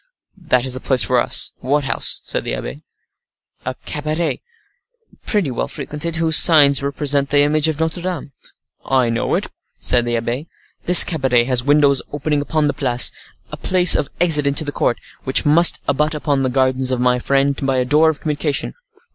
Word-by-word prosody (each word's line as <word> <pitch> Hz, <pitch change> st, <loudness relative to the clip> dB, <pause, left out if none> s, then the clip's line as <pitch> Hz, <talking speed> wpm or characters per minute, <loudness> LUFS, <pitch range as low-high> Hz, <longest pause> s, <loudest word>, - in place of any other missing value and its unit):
"That 125 Hz, -4 st, +1 dB
is 130 Hz, -, -2 dB
the 130 Hz, -, -3 dB
place 130 Hz, -3 st, +1 dB
for -, -, 0 dB
us," -, -, +1 dB, 0.7 s
said -, -, -4 dB
the -, -, -4 dB
abbe. -, -, -6 dB
"What -, -, -11 dB
house?" 70 Hz, -, -17 dB, 0.9 s
"A 130 Hz, -, -3 dB
cabaret, 155 Hz, +3 st, -3 dB, 0.9 s
pretty 200 Hz, -, -1 dB
well 120 Hz, -, -4 dB
frequented, 160 Hz, +3 st, -6 dB
whose 165 Hz, -2 st, +3 dB
sign 150 Hz, -4 st, +6 dB
represents 140 Hz, 0 st, -1 dB
the 145 Hz, 0 st, +2 dB
image 150 Hz, +1 st, +1 dB
of 160 Hz, -2 st, -3 dB
Notre 160 Hz, +2 st, -3 dB
Dame." 175 Hz, -5 st, -5 dB, 0.5 s
"I 130 Hz, -3 st, 0 dB
know 115 Hz, -, -2 dB
it," -, -, -4 dB, 0.3 s
said 120 Hz, -1 st, 0 dB
the 120 Hz, 0 st, -2 dB
abbe. 120 Hz, +7 st, -5 dB, 0.4 s
"This 180 Hz, 0 st, +8 dB
cabaret 130 Hz, -7 st, 0 dB
has 125 Hz, -1 st, -1 dB
windows 140 Hz, -1 st, +2 dB
opening 145 Hz, 0 st, -2 dB
upon 155 Hz, +1 st, -2 dB
the 145 Hz, -, -1 dB
Place, 125 Hz, -3 st, +1 dB, 0.4 s
a -, -, -7 dB
place 180 Hz, -1 st, +5 dB
of 140 Hz, -, -2 dB
exit 150 Hz, -5 st, +5 dB
into 140 Hz, +2 st, 0 dB
the 145 Hz, -, -4 dB
court, 120 Hz, -, -1 dB, 0.3 s
which 130 Hz, -, +1 dB
must 165 Hz, +4 st, +4 dB
abut 150 Hz, +2 st, -1 dB
upon 145 Hz, -2 st, -2 dB
the 130 Hz, -, -1 dB
gardens 130 Hz, 0 st, -1 dB
of 130 Hz, -1 st, -2 dB
my 125 Hz, 0 st, +1 dB
friend 140 Hz, +2 st, -1 dB
by 135 Hz, -1 st, -1 dB
a 125 Hz, -, 0 dB
door 150 Hz, +5 st, +3 dB
of 155 Hz, -, -5 dB
communication." 150 Hz, -1 st, -3 dB
145 Hz, 185 wpm, -17 LUFS, 130-155 Hz, 0.9 s, This